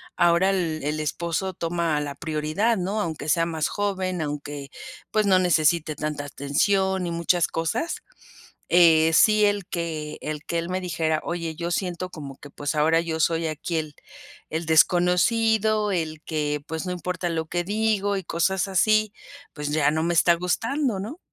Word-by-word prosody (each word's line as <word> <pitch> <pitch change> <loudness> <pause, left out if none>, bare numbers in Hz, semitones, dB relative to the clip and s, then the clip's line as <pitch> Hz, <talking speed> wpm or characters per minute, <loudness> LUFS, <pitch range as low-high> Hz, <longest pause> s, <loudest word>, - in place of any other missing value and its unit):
ahora 175 +2 +4
el 170 -5 -1
el 150 +2 -2
esposo 170 +4 -2
toma 165 -2 -1
la 145 -1 -5
prioridad, 160 +9 0
¿no? 195 +4 -2
Aunque 160 -5 -3
sea 165 +1 +3
más 160 -2 -1
joven 190 -4 -2
aunque 145 -1 -5 0.4
pues 215 -1 +2
no 190 - +5
necesite 165 -3 +2
tanta 150 -1 -4
atención 190 +7 0
y 170 - -3
muchas 170 +1 +2
cosas, 165 - -2 0.7
eh, 165 -2 +6
sí 215 +3 +5
el 205 -2 0
que 160 -3 -4
el 150 -1 -5
que 170 - -2
el 170 - -4
me 185 +1 -2
dijera: 160 -3 -1
"Oye 170 -2 -3
yo 170 +1 -3
siento 180 0 -2
como 140 -5 -9
que 145 - -11
pues 145 +2 -4
ahora 160 +2 +3
yo 165 -1 -3
soy 165 +1 +1
aquí 155 +2 -3
el 155 -2 -3 0.6
el 160 +1 -3
desconocido 210 +6 +3
el 160 -4 -2
que 150 -2 -2
pues 160 +3 -4
no 180 - -2
importa 180 0 -3
lo 160 -1 -2
que 175 +2 -1
digo" 205 0 0
y 190 - -4
cosas 180 +4 0
así 215 +3 +2 0.4
pues 150 -1 -4
ya 150 -1 +3
no 160 - 0
me 170 +1 0
está 170 +1 +5
gustando, 225 - -1
¿no? 225 - -6
170 Hz, 170 wpm, -24 LUFS, 155-190 Hz, 0.7 s, eh